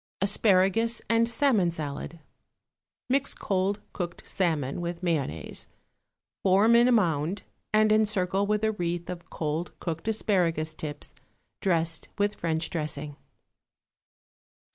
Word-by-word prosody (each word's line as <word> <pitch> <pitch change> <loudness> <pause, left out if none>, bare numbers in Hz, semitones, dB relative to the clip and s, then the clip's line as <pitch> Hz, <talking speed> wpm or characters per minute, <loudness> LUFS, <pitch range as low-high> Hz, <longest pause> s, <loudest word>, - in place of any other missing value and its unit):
=Asparagus 205 +3 +3
and 230 0 +3
Salmon 230 -7 +3
Salad.= 155 0 -5 0.9
Mix 275 +2 +1
cold 195 +1 -1
cooked 175 -2 -5
salmon 160 -5 -1
with 170 +1 -4
mayonnaise, 140 - -2 0.7
form 200 +5 +5
in 240 +1 +6
a - - +4
mound 175 -4 +1 0.3
and 215 0 +4
encircle 200 -2 +2
with 210 +1 0
a 220 - +3
wreath 175 -3 -3
of 175 -1 -9
cold 155 +2 -3
cooked 165 +2 -4
asparagus 175 -8 +1
tips 150 -2 -7 0.5
dressed 165 -3 0
with 205 0 +1
French 165 -2 -2
dressing. 150 -2 -3
180 Hz, 115 wpm, -27 LUFS, 165-210 Hz, 0.9 s, in